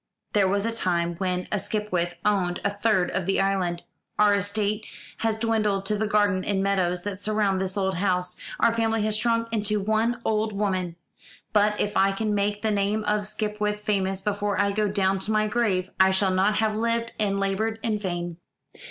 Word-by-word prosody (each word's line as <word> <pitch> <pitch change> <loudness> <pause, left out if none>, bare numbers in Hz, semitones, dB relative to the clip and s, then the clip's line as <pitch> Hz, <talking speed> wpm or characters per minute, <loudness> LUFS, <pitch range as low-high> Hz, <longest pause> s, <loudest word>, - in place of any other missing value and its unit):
There 205 -2 +4
was 200 +2 0
a 230 - -1
time 175 -5 0
when 180 -1 -2
a - - +1
Skipwith 185 -5 -2
owned 185 -4 +1
a 200 - +2
third 205 -3 +1
of 185 - -2
the 195 - +2
island. 185 -3 0 0.3
Our 210 -1 +5
estate 205 +1 -1 0.3
has 225 -1 0
dwindled 215 -3 0
to 210 - 0
the 215 +1 -1
garden 205 -3 +2
and 195 -2 0
meadows 180 -3 0
that 200 -1 -5
surround 205 -2 +1
this 190 +1 -3
old 190 -2 0
house; 180 -1 0 0.2
our 230 - +4
family 225 -1 +1
has 215 0 +1
shrunk 230 +1 +1
into 210 -1 0
one 220 +4 +1
old 215 0 0
woman; 185 -4 -1 0.6
but 210 0 +3
if 205 0 -1
I 195 0 +3
can 215 +1 -1
make 205 +1 -1
the 220 - +1
name 205 +1 0
of 210 0 0
Skipwith 210 -1 -2
famous 195 -2 0
before 205 0 -1
I 200 0 +2
go 210 +1 +1
down 195 -1 +1
to 200 +3 -2
my 215 0 +2
grave, 210 -5 0
I 190 0 +6
shall 190 0 +2
not 190 +3 +2
have 215 -1 +1
lived 230 +1 0
and 200 -2 +1
laboured 205 +3 0
in 220 -3 0
vain." 175 -3 -4
205 Hz, 195 wpm, -25 LUFS, 190-215 Hz, 0.6 s, I